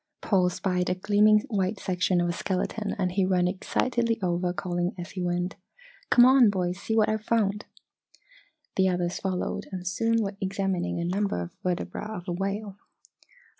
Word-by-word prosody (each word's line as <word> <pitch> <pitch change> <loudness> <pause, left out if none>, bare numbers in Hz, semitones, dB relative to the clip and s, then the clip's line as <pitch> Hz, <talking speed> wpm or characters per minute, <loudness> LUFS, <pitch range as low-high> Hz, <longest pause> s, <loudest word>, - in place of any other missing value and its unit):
Paul 185 -4 +2
spied 180 0 -1
a 180 - +1
gleaming 210 +2 +4
white 200 -2 -2
section 185 -2 +1
of 175 - +1
a 170 - -1
skeleton 200 +4 -2
and 185 -3 0
he 195 +1 +1
ran 185 -1 +2
excitedly 230 +5 0
over 175 0 0
calling 175 0 -2
as 175 0 -7
he 185 - -5
went: 175 +1 -1 0.5
"Come 245 - +7
on, 255 -3 +7
boys! 180 -2 -1
See 220 - -1
what 215 - +4
I've 215 0 -1
found!" 210 -2 0 1.1
The 190 0 +4
others 175 -1 -1
followed 185 -2 -3
and 185 -1 -5
soon 225 +4 +1
were 200 0 -4
examining 195 -2 -1
a 170 - -1
number 195 - 0
of 85 0 -6
vertebra 180 +3 -3
of 180 +2 -9
a - - -2
whale. 195 +2 -3
190 Hz, 170 wpm, -27 LUFS, 180-210 Hz, 1.1 s, Come